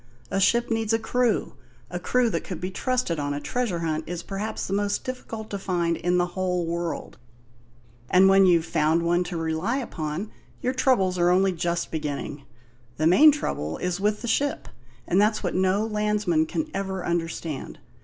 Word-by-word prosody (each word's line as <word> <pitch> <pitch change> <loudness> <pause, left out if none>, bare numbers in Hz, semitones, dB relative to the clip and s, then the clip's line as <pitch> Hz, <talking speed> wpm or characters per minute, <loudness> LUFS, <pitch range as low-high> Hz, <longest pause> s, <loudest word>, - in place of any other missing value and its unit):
A 195 - +1
ship 235 +5 +2
needs 225 -1 0
a - - +4
crew; 240 +1 0 0.4
a - - -3
crew 250 -2 +1
that 165 - -2
could 180 - -6
be 185 +1 -4
trusted 250 - -1
on 145 0 -2
a - - -2
treasure 210 -1 -2
hunt 160 -1 -1
is 175 0 -4
perhaps 210 +2 -4
the 195 - -3
most 205 0 0
difficult 225 -4 -6
to 200 - -3
find 175 -3 0
in 180 +2 0
the 175 - +3
whole 180 -2 -1
world; 170 -4 -4 0.9
and 185 +1 +6
when 195 0 +6
you've 170 -2 +4
found 160 +1 +2
one 175 +1 +2
to 175 -1 -4
rely 165 +9 -1
upon, 175 - -4 0.3
your 255 - -1
troubles 195 -9 +2
are 175 0 +4
only 190 +2 +4
just 170 0 -2
beginning. 145 -2 -4 0.5
The 155 - 0
main 280 - +8
trouble 80 - -3
is 180 0 -2
with 210 +2 0
the - - -3
ship, 280 +5 0 0.4
and 185 +3 +3
that's 215 +1 +2
what 180 - -1
no 190 +3 +2
landsman 210 -7 +1
can 315 - -3
ever 190 -2 -3
understand. 165 -3 -3
185 Hz, 185 wpm, -25 LUFS, 170-215 Hz, 0.9 s, main